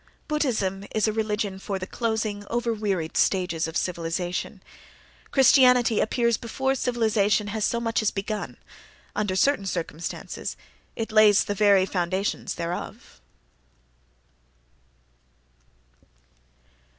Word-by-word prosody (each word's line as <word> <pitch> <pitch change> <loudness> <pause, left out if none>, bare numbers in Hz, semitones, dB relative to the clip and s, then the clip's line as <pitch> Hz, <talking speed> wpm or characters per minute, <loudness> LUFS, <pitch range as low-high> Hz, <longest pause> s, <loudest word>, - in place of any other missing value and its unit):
Buddhism 220 - -1
is 215 0 +2
a 215 - 0
religion 210 -3 -2
for 195 0 -3
the 185 - -5
closing, 220 -2 -2
over 235 0 0
wearied 195 -7 -2
stages 180 -4 +1
of 160 - -3
civilization. 175 0 -3 0.7
Christianity 250 -4 +5
appears 235 0 +1
before 265 +3 -1
civilization 220 -5 +1
has 215 0 -1
so 235 - 0
much 230 -1 0
as 215 - +2
begun—under 205 -1 -6
certain 200 0 +2
circumstances 170 -2 -5 0.4
it 225 -1 -4
lays 215 -2 +6
the 205 - -2
very 200 -2 +4
foundations 185 +1 -2
thereof. 170 +1 -6
210 Hz, 100 wpm, -25 LUFS, 190-230 Hz, 0.7 s, lays